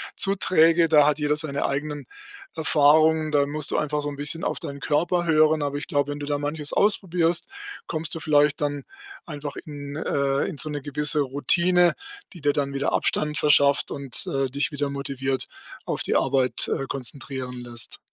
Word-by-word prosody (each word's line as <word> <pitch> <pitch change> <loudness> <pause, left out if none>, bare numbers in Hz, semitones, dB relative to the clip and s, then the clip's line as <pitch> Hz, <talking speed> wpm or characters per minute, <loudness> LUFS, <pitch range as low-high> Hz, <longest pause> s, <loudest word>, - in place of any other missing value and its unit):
zu 195 0 +5
träge, 165 -3 +4
da 150 -2 +5
hat 150 0 +1
jeder 150 0 +1
seine 150 -2 -3
eigenen 145 0 -3 0.5
Erfahrungen, 155 0 +3
da 145 -1 +3
musst 150 +1 -3
du - - 0
einfach 150 0 -1
so 145 - -4
'n 145 - -7
bisschen 145 +3 0
auf - - -2
deinen 140 0 -7
Körper 175 +4 0
hören, 155 -1 +3
aber 145 0 -3
ich 145 - -6
glaube, 145 -3 0
wenn 145 - -6
du - - -4
da 145 0 -1
manches 145 +1 -4
ausprobierst, 175 -4 +1 0.4
kommst 160 0 -3
du - - -5
vielleicht 150 -2 +2
dann 145 -1 -2 0.4
einfach 145 -3 -7
in 145 -2 -8
äh, 140 -2 0
in 180 - -6
so 155 - -2
'ne 145 -1 -4
gewisse 150 +2 0
Routine, 170 +6 +2 0.4
die 175 - -11
dir 145 0 +2
dann 140 -1 -2
wieder 140 +1 -1
Abstand 150 0 +1
verschafft 145 -2 +3
und, 140 -3 +1
äh, 135 -1 -1
dich 140 +5 -2
wieder 145 -1 -2
motiviert 135 -1 -3 0.4
auf - - -3
die - - -1
Arbeit, 130 -3 +1
äh, 135 - -2
konzentrieren 130 -1 -3
lässt. 120 -1 -3
145 Hz, 185 wpm, -24 LUFS, 140-155 Hz, 0.5 s, zu